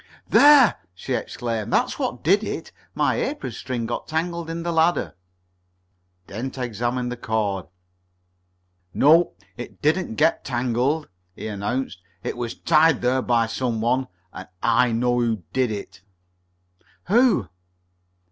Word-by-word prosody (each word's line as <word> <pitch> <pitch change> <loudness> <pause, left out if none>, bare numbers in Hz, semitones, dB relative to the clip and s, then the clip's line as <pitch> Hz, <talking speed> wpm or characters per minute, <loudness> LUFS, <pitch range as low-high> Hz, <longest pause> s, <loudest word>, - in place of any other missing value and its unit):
"There!" 285 -5 +7 0.2
she 90 - -4
exclaimed, 115 -3 -3
"That's - - +1
what - - -3
did - - +3
it. - - -5 0.2
My - - +1
apron - - -3
string 120 -3 -4
got - - -4
tangled 170 +1 -2
in 165 0 -4
the 170 - -1
ladder." 165 +2 +1 1.1
Dent 125 +8 -6
examined 120 +1 -2
the 125 - -5
cord. 105 -5 -2 1.3
"No, 160 +4 +5 0.2
it 120 - -9
didn't 155 -4 0
get 160 +5 +2
tangled," 130 +4 0 0.3
he - - -8
announced. 105 0 -3 0.2
"It - - -3
was 120 -1 -5
tied 160 -4 +3
there 130 +1 +2
by 120 -2 +2
some 115 0 -2
one, 125 +3 +1 0.3
and 95 - -8 0.2
I 120 +1 +3
know 120 +2 +1
who 115 -5 0
did 130 -2 +1
it." 100 -3 -7 1.0
"Who?" 220 - +3
125 Hz, 130 wpm, -23 LUFS, 115-160 Hz, 1.3 s, There